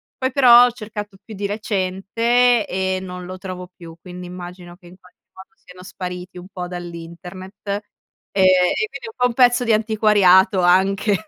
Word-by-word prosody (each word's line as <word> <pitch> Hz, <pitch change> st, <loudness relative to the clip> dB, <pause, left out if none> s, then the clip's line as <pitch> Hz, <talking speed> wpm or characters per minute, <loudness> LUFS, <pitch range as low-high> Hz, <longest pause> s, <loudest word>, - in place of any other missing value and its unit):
poi, 260 Hz, 0 st, -2 dB
però, 245 Hz, -2 st, +7 dB
ho 245 Hz, -, 0 dB
cercato 210 Hz, -3 st, -8 dB
più 220 Hz, -, -11 dB
di 200 Hz, 0 st, -3 dB
recente 215 Hz, +4 st, 0 dB
e 190 Hz, 0 st, -2 dB
non 180 Hz, -1 st, -8 dB
lo 185 Hz, +1 st, -8 dB
trovo 185 Hz, -1 st, -7 dB
più, 165 Hz, -2 st, -12 dB
quindi 180 Hz, 0 st, -10 dB
immagino 175 Hz, 0 st, -10 dB
che 180 Hz, -, -23 dB
in 175 Hz, -, -15 dB
qualche 180 Hz, -1 st, -23 dB, 0.2 s
modo 190 Hz, 0 st, -14 dB
siano 180 Hz, -3 st, -16 dB
spariti 180 Hz, -1 st, -8 dB
un 180 Hz, +1 st, -10 dB
po' 180 Hz, -2 st, -6 dB
dall'internet 175 Hz, +2 st, -9 dB, 0.8 s
e 195 Hz, -, 0 dB, 0.4 s
e 435 Hz, -, 0 dB
quindi 460 Hz, -, -9 dB
un 445 Hz, -, -15 dB
po' 250 Hz, -, +2 dB
un 245 Hz, -, -5 dB
pezzo 245 Hz, 0 st, +4 dB
di 230 Hz, -2 st, +2 dB
antiquariato 205 Hz, -4 st, +3 dB
anche. 190 Hz, +4 st, +2 dB
190 Hz, 175 wpm, -20 LUFS, 180-220 Hz, 0.8 s, però